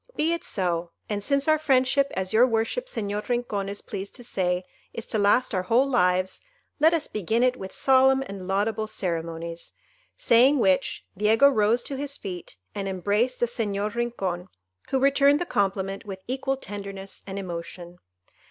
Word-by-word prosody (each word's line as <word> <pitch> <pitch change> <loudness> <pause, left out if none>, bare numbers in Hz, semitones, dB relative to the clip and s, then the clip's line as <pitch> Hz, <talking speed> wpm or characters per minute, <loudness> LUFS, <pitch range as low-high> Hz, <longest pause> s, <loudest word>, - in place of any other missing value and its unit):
"Be 320 +2 +1
it 335 - -3
so; 175 -3 -2 0.2
and 205 -1 -2
since 280 +5 +1
our 310 0 +4
friendship, 275 -1 +2
as 190 -1 -2
your 240 +3 +6
worship 230 - -1
Señor 210 - -3
Rincon 225 -5 -1
is 200 - -5
pleased 200 -1 -6
to 245 - -6
say, 180 -5 -1 0.3
is 230 - -5
to 220 - -2
last 205 +5 +3
our 185 - +1
whole 230 +8 +3
lives, 185 -8 +1 0.4
let 315 +2 +6
us 330 -3 0
begin 220 +4 0
it 255 0 +3
with 190 -5 -8
solemn 265 0 +4
and 195 -4 -8
laudable 215 +3 0
ceremonies,"—saying 170 - 0
which, 190 -7 +1
Diego 220 +7 +5
rose 235 -2 +2
to 275 - -4
his 280 0 -5
feet, 180 - -7 0.2
and 195 -1 -4
embraced 205 +7 0
the - - +3
Señor 210 -3 -2
Rincon, 195 -7 -2 0.4
who 270 - +1
returned 280 +2 +4
the 350 - -2
compliment 195 - -1
with 190 -2 -8
equal 270 +1 -1
tenderness 195 -4 -7
and 195 0 -5
emotion. 175 -1 -7
210 Hz, 165 wpm, -25 LUFS, 190-255 Hz, 0.4 s, your